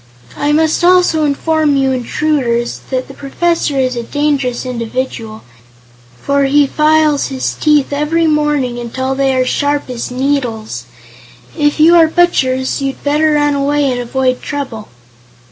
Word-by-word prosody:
"I 290 - -1
must 315 +2 +1
also 355 -3 +4
inform 300 +1 +1
you 270 -1 +1
intruders 250 -2 -1
that 255 -1 -2
the 275 - -11
Professor 290 +1 -1
is 255 -1 0
a 240 - -3
dangerous 275 -1 -1
individual, 230 -2 -5 0.8
for 280 0 +1
he 285 +1 +3
files 305 0 +2
his 265 -1 -3
teeth 295 -2 +1
every 305 +3 0
morning 295 -5 0
until 260 +3 -3
they 270 -1 0
are 255 0 +1
sharp 285 0 -1
as 240 -2 -5
needles. 250 - -2 0.7
If 295 +1 0
you 325 +3 +6
are 325 -1 +6
butchers, 270 -6 +1
you'd 270 -1 -4
better 300 +2 +2
run 290 -1 +2
away 285 0 0
and 245 -1 -2
avoid 255 +1 -1
trouble." 260 -7 -5
280 Hz, 145 wpm, -14 LUFS, 255-300 Hz, 0.8 s, you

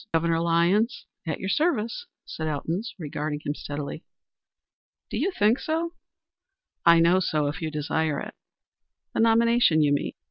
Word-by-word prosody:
"Governor 165 0 +2
Lyons, 170 +8 +2 0.2
at 160 - -2
your 190 - -3
service," 300 - 0 0.2
said 155 - -5
Elton, 155 +5 -2 0.2
regarding 150 -2 -4
him 145 - -1
steadily. 145 +1 -6 1.1
"Do - - -2
you - - +1
think 225 - +2
so?" 330 +2 -2 0.9
"I 170 -1 +7
know 170 +3 +5
so, 155 -4 0
if 145 +3 -3
you 160 - -2
desire 150 0 -1
it." - - -7 0.8
"The - - -2
nomination, 230 -7 +4
you 145 -1 +3
mean?" 145 - -1
170 Hz, 145 wpm, -26 LUFS, 155-225 Hz, 1.1 s, I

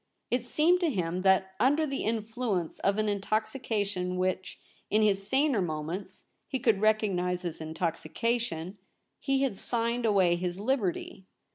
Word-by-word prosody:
It 245 0 0
seemed 330 +7 +3
to 345 -3 +2
him 180 - -1
that 190 0 +3
under 290 +5 +3
the 275 -2 -3
influence 220 -4 -2
of 200 +1 +1
an 215 0 +1
intoxication 205 -3 -1
which, 185 0 -2 0.3
in 215 +1 +3
his 195 -2 +2
saner 270 -5 +2
moments, 175 +4 -4 0.2
he 265 - -2
could 225 -6 +2
recognise 185 -5 +1
as 165 -2 -4
intoxication, 165 +4 -2 0.4
he 270 -1 +1
had 245 -8 -1
signed 235 0 0
away 185 -5 +4
his 180 +1 -3
liberty. 205 -5 -2
205 Hz, 140 wpm, -29 LUFS, 180-235 Hz, 0.4 s, away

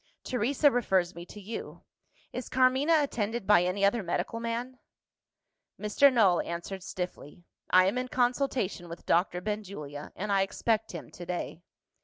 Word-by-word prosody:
Teresa 265 +4 +2
refers 190 -8 +1
me 170 +1 -9
to 210 - -10
you. 210 +3 -7 0.5
Is 250 - -5
Carmina 265 +5 +4
attended 230 -4 -2
by 205 -3 +6
any 190 +3 +1
other 220 +3 +2
medical 180 +5 -2
man?" 235 +2 -4 1.0
Mr. 210 +7 +4
Null 200 -8 +4
answered 170 +3 -5
stiffly, 180 -3 -6 0.3
"I 185 0 +6
am 200 +7 +1
in 255 - -3
consultation 245 -8 0
with 170 - -9
Doctor 180 +1 +2
Benjulia; 180 -8 -5
and 205 +2 -3
I 195 -1 +4
expect 220 +3 0
him - - -8
to 175 - -9
day." 175 -1 -4
205 Hz, 150 wpm, -29 LUFS, 180-245 Hz, 1.0 s, by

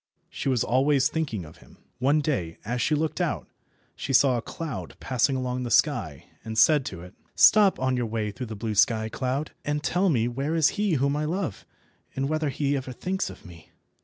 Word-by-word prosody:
She - - -3
was 125 -4 +2
always 135 +2 +2
thinking 140 - -3
of 75 - -14
him. - - -19 0.2
One 140 +4 +3
day, 95 - -2
as 120 +3 -2
she 155 - +2
looked 155 +1 -1
out, - - -2 0.5
she 135 - -4
saw 130 0 +5
a 120 - -1
cloud 125 - -6
passing 130 +1 +1
along 125 -1 -2
the 125 - -3
sky, 80 -7 +1 0.2
and 110 0 -6
said 145 +4 +5
to 90 -3 -6
it— 90 +2 -12 0.2
"Stop 210 -3 +6
on 130 0 +1
your 120 -2 -1
way 110 -1 -2
through 125 +4 -6
the 110 - -6
blue 110 +1 -3
sky, 110 +1 +2
cloud, 130 +5 -2
and 150 0 -2
tell 185 +4 +2
me 120 -7 +2
where 135 +6 -2
is 160 -1 +4
he 205 -3 0
whom 140 0 +1
I 150 +1 -1
love, 165 - -3 0.5
and 135 0 -1
whether 155 0 0
he 140 +1 -1
ever 130 -1 -4
thinks 190 +8 -2
of - - -13
me." 85 -3 -14
130 Hz, 210 wpm, -26 LUFS, 115-150 Hz, 0.5 s, Stop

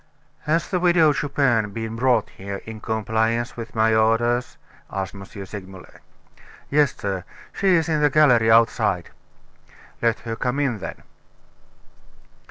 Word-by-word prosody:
"Has 165 +2 +1
the 180 - -1
Widow 170 -4 +4
Chupin 125 -8 0
been 115 0 -5
brought 120 -2 +1
here, 100 0 -7
in 110 -1 -8
compliance 110 +2 -1
with 115 -1 -8
my 110 0 +3
orders?" 120 +3 +1 0.3
asked 95 -1 -4
M. 100 - -10
Segmuller. 95 -2 -10 0.7
"Yes, 145 -2 +3
sir; 95 -3 -4 0.3
she 190 -2 +3
is 165 -1 +1
in 155 -2 0
the 150 - +4
gallery 125 -6 +4
outside." 110 -6 +2 0.9
"Let 115 -1 +1
her 115 -1 -4
come 125 +4 -2
in 130 -7 0
then." 80 -3 -8
115 Hz, 135 wpm, -22 LUFS, 110-140 Hz, 0.9 s, Widow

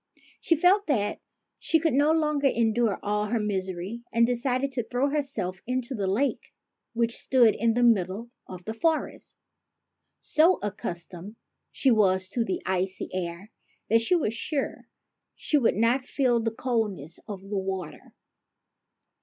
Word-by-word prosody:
She 335 - +2
felt 370 +6 +3
that 215 -9 0 0.4
she 325 - +3
could 320 -2 +1
no 290 +3 +4
longer 300 -3 +2
endure 230 -4 +1
all 210 0 0
her 230 +2 0
misery, 190 +1 -3
and 235 0 +4
decided 255 +2 0
to 245 -2 -2
throw 250 +5 -1
herself 225 -11 -1
into 255 +1 -2
the 200 -5 -2
lake 240 +9 -1 0.4
which 235 0 +1
stood 240 -5 +4
in 230 +1 +1
the 245 - +2
middle 220 0 +1 0.2
of 180 -1 -10
the 220 - -4
forest. 320 +6 -2 0.8
So 325 +4 +3
accustomed 180 0 -5 0.5
was 195 -7 +4
she - - -6
to 240 - +1
the 190 - -3
icy 190 0 -1
air 180 +2 -5 0.4
that 230 0 +5
she 295 +10 +3
was 275 -11 0
sure 275 +5 -3 0.5
she 300 - +1
would 235 - +2
not 235 +5 +2
feel 255 -3 +1
the 225 0 0
coldness 215 - -3
of 205 -3 -6
the 200 -1 -2
water. 190 -3 -6
230 Hz, 150 wpm, -26 LUFS, 195-265 Hz, 0.8 s, that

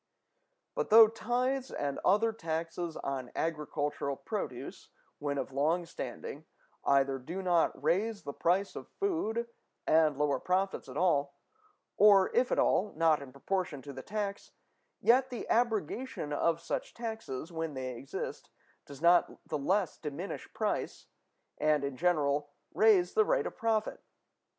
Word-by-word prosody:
But - - -2
though 220 +1 +10
tithes 250 +4 -1
and 140 -1 -3
other 220 +4 +3
taxes 165 -2 -4
on 135 -2 -4
agricultural 150 -3 -2
produce, - - -6 0.3
when 145 -1 -2
of 135 - -3
long 160 +6 +1
standing, 145 0 -7 0.4
either 135 -1 +3
do 170 +9 -6
not 170 -6 +1
raise 200 +7 +1
the 140 - -5
price 185 +6 +1
of - - -7
food 235 - -1 0.4
and 155 -3 +4
lower 145 -1 +1
profits 190 -4 -1
at 130 - -7
all, 145 -5 +2 0.6
or, 200 -2 +6
if 250 +1 +3
at - - +2
all, 205 +2 +2
not 160 -2 +3
in 135 -2 -9
proportion 150 0 -3
to 140 - -8
the 130 - -7
tax, 205 +3 -4 0.5
yet 260 +2 +4
the 245 - -6
abrogation 225 - 0
of 165 +2 +1
such - - -4
taxes, 220 - -5
when 160 -3 -4
they 130 -1 -4
exist, 135 +3 -6 0.4
does 140 +2 -11
not 175 +1 +3
the 150 - -2
less 185 +4 0
diminish 155 +5 -6
price, - - -2 0.5
and, 150 -2 +2
in 140 -1 -3
general, 145 -3 +1 0.2
raise 205 -5 +4
the 435 - +5
rate - - +1
of - - -5
profit. 225 -1 -1
170 Hz, 145 wpm, -31 LUFS, 145-210 Hz, 0.6 s, though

